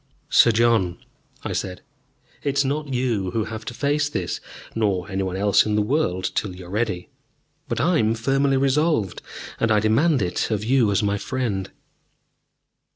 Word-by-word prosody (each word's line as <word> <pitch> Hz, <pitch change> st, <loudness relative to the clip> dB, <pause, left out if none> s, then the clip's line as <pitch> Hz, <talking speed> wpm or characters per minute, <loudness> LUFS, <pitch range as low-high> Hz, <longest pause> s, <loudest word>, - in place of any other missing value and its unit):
"Sir 115 Hz, -, +6 dB
John," 110 Hz, -6 st, +2 dB, 0.5 s
I -, -, -3 dB
said, 90 Hz, -2 st, -4 dB, 0.6 s
"it 140 Hz, -1 st, -1 dB
is 140 Hz, -, +3 dB
not 145 Hz, +1 st, -2 dB
you 120 Hz, -7 st, 0 dB
who 110 Hz, +4 st, -1 dB
have 110 Hz, 0 st, -7 dB
to -, -, -5 dB
face 145 Hz, +2 st, +1 dB
this, -, -, -3 dB, 0.3 s
nor 100 Hz, -5 st, 0 dB
any 95 Hz, 0 st, -1 dB
one 95 Hz, -1 st, -2 dB
else 100 Hz, +1 st, +4 dB
in 105 Hz, -1 st, -1 dB
the 105 Hz, -, +3 dB
world 105 Hz, -, 0 dB
till 95 Hz, -4 st, -2 dB
you 90 Hz, 0 st, -10 dB
are 90 Hz, -, -11 dB
ready. 100 Hz, -4 st, -2 dB, 0.6 s
But -, -, -2 dB
I 175 Hz, -1 st, +3 dB
am 110 Hz, +1 st, +2 dB
firmly 135 Hz, +4 st, +1 dB
resolved, 135 Hz, -, +1 dB, 0.4 s
and 115 Hz, -, +1 dB
I 105 Hz, -, +5 dB
demand 115 Hz, -, +3 dB
it 90 Hz, -, -1 dB
of 105 Hz, -2 st, -1 dB
you 120 Hz, -1 st, +3 dB
as 100 Hz, +1 st, +1 dB
my 100 Hz, 0 st, 0 dB
friend." 110 Hz, -8 st, -2 dB
110 Hz, 175 wpm, -23 LUFS, 100-135 Hz, 0.6 s, Sir